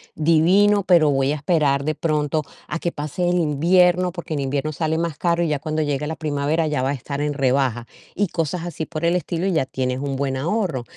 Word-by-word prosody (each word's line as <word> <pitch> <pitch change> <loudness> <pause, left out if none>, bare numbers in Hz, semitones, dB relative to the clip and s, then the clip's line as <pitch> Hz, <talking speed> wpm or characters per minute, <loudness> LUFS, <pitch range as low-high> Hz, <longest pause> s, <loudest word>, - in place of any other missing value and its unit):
divino, 185 +6 +4
pero 170 -5 +4
voy 135 0 +1
a - - 0
esperar 145 -3 +1
de 155 - 0
pronto 155 -1 0 0.3
a 170 - -3
que 170 - -2
pase 155 +4 -2
el 180 - +2
invierno, 175 +4 +3
porque 175 -2 -6
en 145 - -2
invierno 140 +3 -2
sale 160 +1 -1
más 165 -3 -2
caro 170 -1 +1
y 165 - 0
ya 145 -2 0
cuando 155 0 -2
llegue 145 0 -2
la 160 - -3
primavera 150 +1 -1
ya 150 -4 -1
va 130 - 0
a 140 - 0
estar 140 +2 -5
en 150 0 -1
rebaja". 130 -3 +1 0.3
Y 205 -1 +1
cosas 165 +1 -2
así 165 -2 -4
por 165 0 -4
el 170 +1 +2
estilo 175 0 -2
y 190 - +1
ya 155 -5 +1
tienes 130 -1 -2
un 140 -1 -3
buen 135 -1 -1
ahorro. 165 - -1
155 Hz, 230 wpm, -22 LUFS, 140-170 Hz, 0.3 s, divino